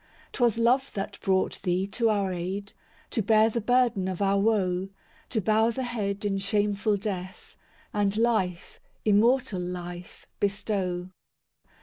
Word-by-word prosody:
II - - -28
'Twas 240 -3 +2
love 250 +4 +2
that 195 0 -4
brought 190 -2 0
Thee 185 0 0
to 225 +3 0
our 200 -3 +1
aid, 190 +4 -4 0.4
To 225 - 0
bear 220 +2 +4
the 235 - -1
burden 240 -4 +2
of 185 -2 -3
our 200 0 +2
woe, 195 -3 +1 0.4
To 220 - 0
bow 220 +3 +3
the 260 +3 -3
head 210 -4 -3
in 195 -1 0
shameful 205 +1 +1
death, 190 -2 -6 0.4
And 205 0 +1
life, 215 -7 0 0.3
immortal 215 -1 +3
life, 175 0 -7
bestow. 190 -3 -1
200 Hz, 140 wpm, -27 LUFS, 190-225 Hz, 0.4 s, bear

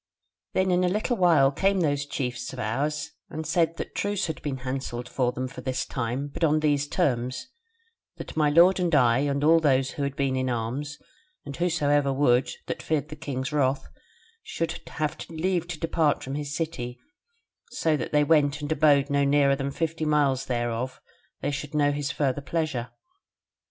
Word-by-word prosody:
"Then 185 0 +2
in 180 0 +3
a 180 - +3
little 215 +6 0
while 170 -8 +4
came 195 +5 +1
those 145 -3 0
chiefs 125 -2 -3
of - - -8
ours 145 +6 -2 0.2
and 155 +1 -5
said 165 +1 +1
that - - -6
truce 205 -1 -1
had 160 - -5
been 135 -3 -4
hanselled 130 -2 -4 0.3
them 130 +1 -2
for 125 - -9
this 130 0 -2
time, 125 +3 -3
but 145 - -6
on 155 -1 +4
these 145 -2 +1
terms, 130 - -1 0.7
that - - -8
my 155 -1 +3
lord 175 +5 +6
and 175 -3 +2
I 120 -3 +4
and 140 0 0
all 165 +2 +6
those 135 -4 +2
who - - -6
had 140 -1 -2
been 135 -2 0
in 130 0 0
arms, 125 +5 -3 0.5
and 140 - -6
whosoever 145 -5 +1
would, 135 -2 +3 0.2
that - - -4
feared 155 -1 -1
the 150 - -7
king's 140 -3 -4
wrath, 135 -2 +1 0.5
should 165 - -3 0.2
have 155 -1 -2
leave 175 +1 -1
to 170 -3 -6
depart 160 -2 +1
from 135 - -5
his 145 0 -4
city 130 -7 -4 0.7
so 160 -2 +1
that 140 - -4
they 150 -1 +4
went 145 -1 +3
and 145 +1 -4
abode 145 -2 +4
no 140 0 +3
nearer 140 0 +4
than 135 0 -3
fifty 160 +3 -2
miles 140 -3 +2
thereof 120 +1 -2
till - - -25 0.5
they - - 0
should 145 +1 -5
know 145 -1 +3
his 145 -1 -2
further 140 -1 -1
pleasure. 145 -6 -2
145 Hz, 185 wpm, -26 LUFS, 130-160 Hz, 0.7 s, lord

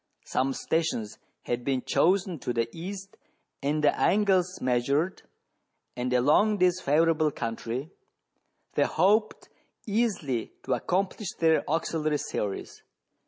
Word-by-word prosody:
Some 135 +1 0
stations 160 -10 -2 0.2
had 120 0 -2
been 130 -1 -1
chosen 185 -2 +2
to 125 - -3
the 115 -1 0
east 195 +3 -8 0.4
and 150 +2 0
the 145 - +4
angles 190 -3 +2
measured, 140 +8 0 0.7
and 125 +1 -2
along 150 - +4
this 180 -1 +2
favourable 155 +1 +3
country, 120 +2 -4 0.8
they - - +3
hoped 210 +6 +1 0.4
easily 200 - -1
to - - 0
accomplish 185 - -1
their 160 -1 +3
auxiliary 155 -1 0
series. 100 -7 -4
160 Hz, 115 wpm, -27 LUFS, 130-185 Hz, 0.8 s, the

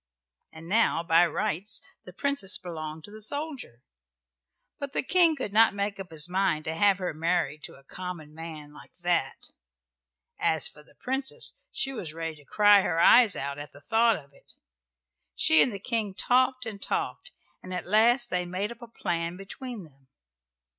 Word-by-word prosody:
And 160 +1 -12
now 205 -4 +2
by 170 +1 +5
rights 205 +3 0 0.3
the 180 - -10
Princess 205 -3 -1
belonged 160 -4 -7
to 205 - -12
the 215 +1 -11
soldier, 280 - -6 1.0
but 280 -1 -5
the - - 0
King 335 +1 +4
could 255 -8 -5
not 220 -1 +5
make 200 0 -2
up 190 -1 -7
his 160 -1 0
mind 180 -4 0
to 160 - -2
have 195 +3 +3
her 185 -3 -3
married 165 -1 -1
to - - -10
a 135 - -18
common 170 -1 -8
man 155 -2 -9
like 150 - -15
that. 175 -6 -1 0.9
As 160 -2 +3
for 150 - -10
the - - -23
Princess 265 +1 -2 0.2
she 270 - -2
was 165 -10 -6
ready 165 -1 -5
to 145 - -19
cry 205 +4 +5
her 165 -3 -1
eyes 230 +3 +7
out 140 +1 -4
at 145 - -9
the 145 - -14
thought 225 +8 +3
of 140 -2 -12
it. - - -22 0.8
She 160 -1 +5
and 245 - +4
the 200 - -5
King 210 -2 -3
talked 255 +2 +2
and 210 -3 -7
talked - - -3
together, - - -16 0.2
and 185 - -10
at 180 -2 -4
last 240 +5 +4
they 180 0 0
made 185 +5 -3
up 235 - -11
a 235 - -9
plan 170 -5 -3
between 220 +3 -8
them. 135 -4 -20
185 Hz, 185 wpm, -27 LUFS, 160-225 Hz, 1.0 s, eyes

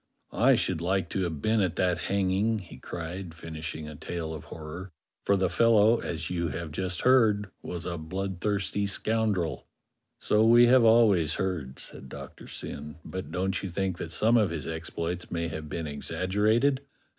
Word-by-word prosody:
*'I - - +5
should 80 - 0
like 95 0 0
to 95 - -1
have 80 -4 -4
been 110 0 +3
at 90 -3 0
that 90 -2 +1
hanging," 100 +3 +1
he 90 -5 -10
cried, 85 +1 -6
finishing 80 -1 -6
a 75 - -8
tale 80 +1 -5
of 80 - -8
horror, 80 +4 -8 0.3
*'for 100 - +4
the 95 -1 +2
fellow, 115 +4 +4
as 80 0 -4
you 85 -1 0
have 80 +1 -5
just 90 +3 -2
heard, 110 -6 +4
was 90 -1 -5
a 85 -2 -3
bloodthirsty 95 +4 -2
scoundrel." 100 - -1 0.5
"So 105 +1 +2
we 120 +2 +7
have 125 0 +6
always 105 -9 +5
heard," 85 -9 -3
said 65 - -8
Doctor - - -10
Syn; 75 +1 -6
"but 95 -5 -6
don't 95 +2 -1
you 95 - -4
think 95 0 -2
that 80 - -5
some 115 +7 +3
of 105 -5 +3
his 80 -2 -4
exploits 85 +2 -4
may 85 -1 -2
have 80 -1 -6
been 80 +2 -3
exaggerated.?" 105 - +1
90 Hz, 170 wpm, -28 LUFS, 80-105 Hz, 0.5 s, we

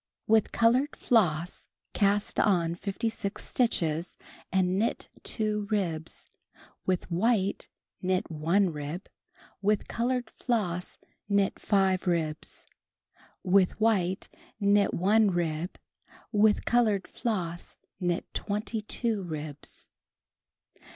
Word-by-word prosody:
With 220 -1 +3
colored 250 +6 +3
floss 175 -7 +1 0.3
cast 205 0 +1
on 170 -5 +3
56 200 +2 -3
stitches 170 -9 0 0.3
and 185 +1 +2
Icnit 230 - -1
2 210 -2 -1
ribs, 170 -7 -1 0.6
with 185 -1 0
white 200 +2 +1 0.3
knit 185 -1 0
1 170 +5 +2
rib, 150 +5 -5 0.6
with 205 +1 +1
colored 245 0 -1
floss 180 -8 -2 0.3
knit 200 -1 +2
5 190 -2 +2
ribs, 160 -3 -2 0.8
with 190 +1 +3
white 195 -4 +1 0.3
knit 200 -1 +4
1 210 +4 +4
rib, 170 -1 -2 0.5
with 210 -1 +3
colored 220 -5 +2
floss 175 -7 -3 0.2
knit 175 -2 0
22 215 +1 -1
ribs. 155 -4 -7
195 Hz, 95 wpm, -28 LUFS, 175-215 Hz, 0.8 s, knit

